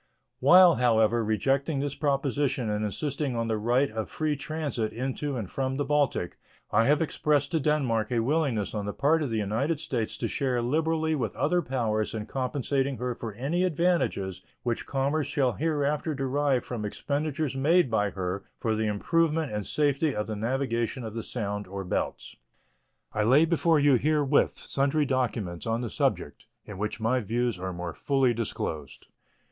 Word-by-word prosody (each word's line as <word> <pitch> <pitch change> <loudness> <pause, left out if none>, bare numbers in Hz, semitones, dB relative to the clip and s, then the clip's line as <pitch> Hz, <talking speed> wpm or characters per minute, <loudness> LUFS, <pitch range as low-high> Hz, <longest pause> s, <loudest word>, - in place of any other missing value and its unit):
While, 175 +5 +7
however, 115 -1 +3
rejecting 135 +7 0
this 140 0 -2
proposition 140 -4 0
and 105 0 -1
insisting 140 +4 -2
on 115 0 -1
the 110 -1 -1
right 120 +5 +2
of 110 0 -4
free 155 -1 -1
transit 140 -6 -3
into 130 +4 -3
and 110 -5 -4
from 135 +5 -2
the 145 - -1
Baltic, 145 -11 0 0.3
I 115 - +4
have 150 +4 +3
expressed 145 -2 0
to 165 - +1
Denmark 130 -7 +1
a 120 -2 +2
willingness 130 -5 0
on 105 -2 -3
the 105 - -3
part 155 +3 +3
of 145 - -1
the 115 - -1
United 115 +10 0
States 115 -6 -3
to - - -2
share 130 -3 0
liberally 160 +5 0
with 120 -9 -2
other 175 +4 +1
powers 115 -7 -1
in 105 -1 -4
compensating 135 +1 -1
her 125 0 -2
for 115 -2 -6
any 150 +9 0
advantages 140 - 0 0.2
which 120 -2 -2
commerce 140 +2 0
shall 140 -3 +1
hereafter 150 0 -1
derive 135 -1 0
from 120 -4 -4
expenditures 145 +5 -2
made 150 +1 +3
by 105 -2 +2
her 95 +1 -4
for 110 -1 -1
the 110 0 0
improvement 160 +8 +1
and 105 -1 -3
safety 145 0 +1
of 105 - -1
the 110 - -4
navigation 120 +1 -1
of 110 -2 -6
the 115 - -3
Sound 105 -3 -4
or 100 +1 -5
Belts. 90 - -3 0.8
I 105 - 0
lay 130 +9 +5
before 165 -1 +3
you 140 -3 +5
herewith 145 +1 +2
sundry 140 +2 0
documents 115 -10 -2
on 115 +1 0
the 120 -4 -4
subject, - - -1 0.2
in 100 -2 -9
which 105 +2 -3
my 115 +4 +1
views 120 -1 -1
are 95 +1 -3
more 90 -1 -5
fully 135 -3 +1
disclosed. 80 - -4
130 Hz, 175 wpm, -27 LUFS, 110-145 Hz, 0.8 s, While